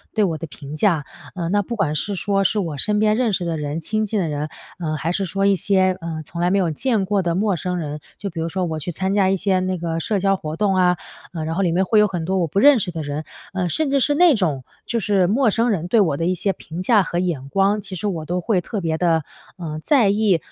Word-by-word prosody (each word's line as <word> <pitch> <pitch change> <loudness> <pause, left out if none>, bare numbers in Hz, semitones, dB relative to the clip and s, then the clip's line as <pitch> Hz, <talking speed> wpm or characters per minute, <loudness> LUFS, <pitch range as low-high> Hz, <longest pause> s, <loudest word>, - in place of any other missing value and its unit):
对 215 - +3
我 165 -5 0
的 165 - -6
评 145 +1 -9
价。 165 -4 +2 0.3
呃， 170 -3 -3
那 205 +2 +2
不 235 +4 -5
管 175 -9 0
是 200 +6 -2
说 195 +1 0
是 210 - +2
我 165 -7 -3
身 210 +7 +2
边 215 0 +3
认 240 -4 +1
识 180 - 0
的 170 -2 -2
人、 150 +2 -3
亲 215 +5 -1
近 205 -1 -1
的 165 - -1
人， 150 0 -2 0.3
呃， 155 -3 -2
还 155 +3 -2
是 195 +2 -1
说 195 +2 -1
一 200 - +5
些， 185 -1 +2
呃， 165 -1 -5
从 170 +3 -8
来 175 - +2
没 195 - +2
有 175 -5 +1
见 220 - 0
过 200 0 +1
的 170 -2 -1
陌 200 -1 +1
生 180 +2 -3
人 150 -3 -4 0.2
就 200 - -4
比 165 - -7
如 165 - -1
说 185 +2 -2
我 160 -2 -3
去 155 - -5
参 190 +3 -1
加 195 -2 +3
一 195 - +2
些 190 0 +1
那 185 0 -1
个 165 -1 -2
社 205 +5 -1
交 195 0 +2
活 155 -3 -5
动， 200 +2 +1
啊。 180 -1 +4 0.5
然 160 +1 -3
后 195 - 0
里 180 -3 +2
面 185 +2 +2
会 215 +3 +3
有 210 - +5
很 180 -4 -4
多 190 +2 0
我 170 - +1
不 160 - -5
认 285 +1 +7
识 185 - -1
的 165 -1 -4
人， 145 +1 -4 0.3
呃， 185 -1 -1
甚 305 - 0
至 275 0 +2
是 290 +3 +3
那 350 0 +6
种 160 - 0 0.2
就 235 - -1
是 195 -3 +2
陌 225 +4 +3
生 230 +3 +1
人 175 -6 -1
对 220 +5 +3
我 160 -8 +1
的 165 - -1
一 180 - +2
些 195 +2 0
评 170 0 -8
价 210 +1 +4
和 175 - -2
眼 165 -7 -2
光， 200 +4 +2
其 190 - -7
实 195 +4 -3
我 165 -6 -3
都 180 +3 -2
会 190 +2 +1
特 200 +3 -4
别 160 -1 -1
地， 165 -2 +2 0.3
呃， 155 -4 -5
在 255 -9 +4
意。 205 -3 +3
185 Hz, 300 characters per minute, -21 LUFS, 165-205 Hz, 0.5 s, 认